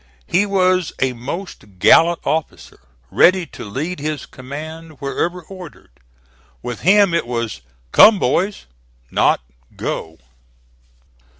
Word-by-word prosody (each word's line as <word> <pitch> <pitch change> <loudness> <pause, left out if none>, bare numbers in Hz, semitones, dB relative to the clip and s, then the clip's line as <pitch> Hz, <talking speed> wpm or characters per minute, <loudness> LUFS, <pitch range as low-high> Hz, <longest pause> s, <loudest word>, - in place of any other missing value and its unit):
He 200 +4 +1
was 185 -3 +1
a 130 -1 +1
most 125 - -8
gallant 165 - +5
officer, 160 0 -3 0.3
ready 185 0 +4
to - - -11
lead 145 - -4
his 150 -1 -4
command 155 +5 -9
wherever 165 +6 -3
ordered. 180 - -12 0.7
With 120 -2 -5
him 195 +1 +4
it 170 -7 0
was 115 -3 -3 0.3
"Come, 215 0 +8
boys," 185 +7 -1 0.5
not - - +2 0.3
"Go." 80 0 -5
160 Hz, 110 wpm, -19 LUFS, 130-185 Hz, 0.7 s, Come